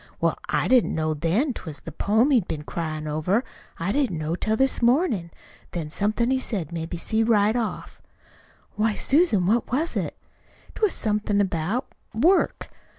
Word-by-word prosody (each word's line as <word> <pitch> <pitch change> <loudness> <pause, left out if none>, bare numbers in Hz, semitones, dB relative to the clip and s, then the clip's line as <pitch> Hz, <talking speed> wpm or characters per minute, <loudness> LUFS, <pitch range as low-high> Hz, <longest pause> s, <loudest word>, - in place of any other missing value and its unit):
"Well, - - 0
I - - +1
didn't 255 -2 +3
know 155 0 0
then 170 - +1
that't - - -8
was 150 -2 -7
the 165 - -8
poem 220 - +2
he'd 235 -9 +3
been 150 -1 -4
cryin' 155 -1 -4
over. 155 - 0 0.4
I 170 +4 -1
didn't 255 - 0
know 155 +1 -2
till 215 +4 0
this 265 0 +1
mornin'. 240 - +2 0.4
Then 160 -3 -4
somethin' 215 +7 0
he 265 - +2
said 195 - -3
made 165 -1 -4
me 175 - -4
see 220 +6 0
right 220 -1 +3
off." 230 -3 -4 0.7
"Why, 215 0 +1
Susan, 270 - +3
what 220 +5 +1
was 310 +7 0
it?" - - -2 0.6
"It - - -10
was 425 -3 +3
somethin' 210 -1 0
about 195 - 0 0.3
work. 345 - +2
210 Hz, 175 wpm, -24 LUFS, 165-245 Hz, 0.7 s, didn't